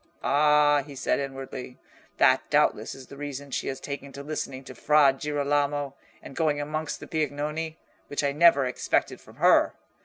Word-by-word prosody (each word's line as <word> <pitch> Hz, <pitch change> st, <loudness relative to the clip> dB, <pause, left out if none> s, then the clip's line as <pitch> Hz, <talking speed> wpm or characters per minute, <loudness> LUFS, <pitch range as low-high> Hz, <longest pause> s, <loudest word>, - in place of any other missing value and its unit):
"Ah," 150 Hz, 0 st, +4 dB
he 140 Hz, 0 st, -11 dB
said, 130 Hz, -, 0 dB
inwardly, 135 Hz, -2 st, -6 dB, 0.4 s
"that -, -, +5 dB
doubtless -, -, +1 dB
is 135 Hz, -, -11 dB
the 140 Hz, -, -13 dB
reason 145 Hz, -1 st, -6 dB
she -, -, -2 dB
has 135 Hz, -, -3 dB
taken 140 Hz, -1 st, -7 dB
to 140 Hz, -, -8 dB
listening 140 Hz, -3 st, -5 dB
to 130 Hz, -, -10 dB
Fra 145 Hz, +2 st, +4 dB
Girolamo, 145 Hz, 0 st, -1 dB, 0.3 s
and 135 Hz, -, -10 dB
going 150 Hz, -3 st, +1 dB
amongst 155 Hz, +1 st, -3 dB
the -, -, -10 dB
Piagnoni, 155 Hz, +1 st, -3 dB, 0.3 s
which 145 Hz, -, -3 dB
I 140 Hz, -, +2 dB
never 145 Hz, -2 st, +5 dB
expected 125 Hz, -, -1 dB
from -, -, -17 dB
her. -, -, +4 dB
145 Hz, 165 wpm, -26 LUFS, 135-150 Hz, 0.4 s, that